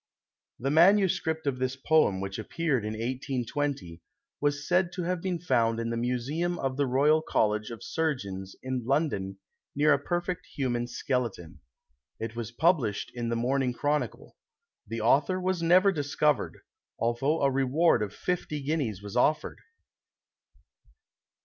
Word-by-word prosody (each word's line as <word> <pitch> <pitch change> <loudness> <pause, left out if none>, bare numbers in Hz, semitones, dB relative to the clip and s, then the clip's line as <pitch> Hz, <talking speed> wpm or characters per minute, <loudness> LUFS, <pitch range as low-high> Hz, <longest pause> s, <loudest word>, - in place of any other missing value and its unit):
[The 135 +3 -1
MS. 190 +4 +5 0.2
of 135 -3 -1
this 130 0 -1
poem, 135 -9 +2
which 95 +2 -4
appeared 140 0 -1
in 105 - -3
1820, 125 - -3 0.4
was 145 0 0
said 180 0 +2
to 180 - -3
have 180 0 -1
been 185 -1 -1
found 115 -9 +1
in 115 0 -2
the - - -1
Museum 130 +9 -1
of 135 -3 -2
the 140 0 +1
Royal 145 +5 +4
College 105 -7 0
of 115 -4 -8
Surgeons, 100 -12 -3
in 130 -1 -2
London, 115 -8 0 0.4
near 150 +1 +5
a 140 - +2
perfect 175 +4 -3
human 120 -3 -1
skeleton. 120 -9 -3 0.6
It 115 0 -5
was 115 -2 -4
published 140 - +1
in 120 -1 -3
the 115 - 0
Morning 125 +2 0
Chronicle. 145 +4 -2 0.5
The 115 0 -4
author 145 - +3
was 185 -1 -1
never 185 +4 +5
discovered, 145 -3 0 0.4
although 135 +7 0
a 135 - +4
reward 135 +1 +3
of 105 -2 -2
fifty 160 +3 -3
guineas 135 - -2
was 100 -1 -7
offered. 150 +5 +1
135 Hz, 145 wpm, -28 LUFS, 115-155 Hz, 0.6 s, MS